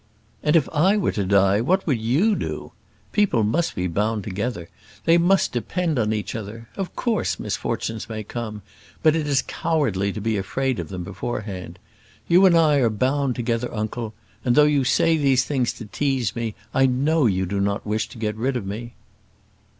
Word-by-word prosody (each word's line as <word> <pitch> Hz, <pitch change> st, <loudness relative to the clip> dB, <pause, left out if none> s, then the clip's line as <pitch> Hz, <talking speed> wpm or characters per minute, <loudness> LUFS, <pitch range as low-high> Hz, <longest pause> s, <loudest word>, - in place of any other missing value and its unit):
"And 150 Hz, +2 st, +2 dB
if 155 Hz, -5 st, +4 dB
I 185 Hz, +7 st, +4 dB
were 200 Hz, -, +1 dB
to 100 Hz, -, -1 dB
die, 100 Hz, +1 st, +3 dB
what 185 Hz, +10 st, +1 dB
would 130 Hz, -8 st, 0 dB
you 155 Hz, -, +2 dB
do? -, -, -5 dB, 0.4 s
People 195 Hz, -, +2 dB
must 160 Hz, +11 st, 0 dB
be 90 Hz, -, -1 dB
bound 105 Hz, +4 st, -1 dB
together. 105 Hz, -3 st, -4 dB, 0.4 s
They 165 Hz, +1 st, +5 dB
must 185 Hz, +3 st, +3 dB
depend 160 Hz, +4 st, -1 dB
on 110 Hz, -2 st, +1 dB
each 105 Hz, -1 st, -2 dB
other. 115 Hz, +1 st, -7 dB
Of 195 Hz, -2 st, -5 dB
course, 230 Hz, -3 st, -1 dB
misfortunes 110 Hz, -1 st, -3 dB
may 110 Hz, -1 st, -4 dB
come; 110 Hz, -2 st, -6 dB, 0.4 s
but 155 Hz, -1 st, +5 dB
it 155 Hz, -2 st, -1 dB
is 140 Hz, -2 st, +2 dB
cowardly 110 Hz, -, 0 dB
to 105 Hz, -, -5 dB
be 110 Hz, +1 st, 0 dB
afraid 130 Hz, +6 st, -1 dB
of -, -, -5 dB
them 90 Hz, -2 st, -5 dB
beforehand. 95 Hz, -2 st, -5 dB, 0.5 s
You 180 Hz, +3 st, +6 dB
and 170 Hz, -2 st, +5 dB
I 155 Hz, -3 st, +4 dB
are 125 Hz, -4 st, +3 dB
bound 130 Hz, +4 st, 0 dB
together, 120 Hz, 0 st, -1 dB
uncle; 110 Hz, +1 st, -4 dB, 0.3 s
and 120 Hz, -2 st, +2 dB
though 150 Hz, -, +7 dB
you 145 Hz, -2 st, +3 dB
say 160 Hz, +5 st, +3 dB
these 135 Hz, -3 st, +3 dB
things 130 Hz, -5 st, 0 dB
to 115 Hz, -, -9 dB
tease 130 Hz, -2 st, -1 dB
me, 115 Hz, -2 st, -3 dB, 0.2 s
I 135 Hz, 0 st, +4 dB
know 140 Hz, +3 st, +2 dB
you 95 Hz, -2 st, +1 dB
do 100 Hz, +2 st, -2 dB
not 100 Hz, 0 st, -1 dB
wish 110 Hz, +2 st, -1 dB
to 125 Hz, -, -12 dB
get 105 Hz, -1 st, -2 dB
rid 125 Hz, +4 st, -1 dB
of 110 Hz, -, -5 dB
me." 115 Hz, +4 st, -6 dB
120 Hz, 190 wpm, -23 LUFS, 105-150 Hz, 0.5 s, though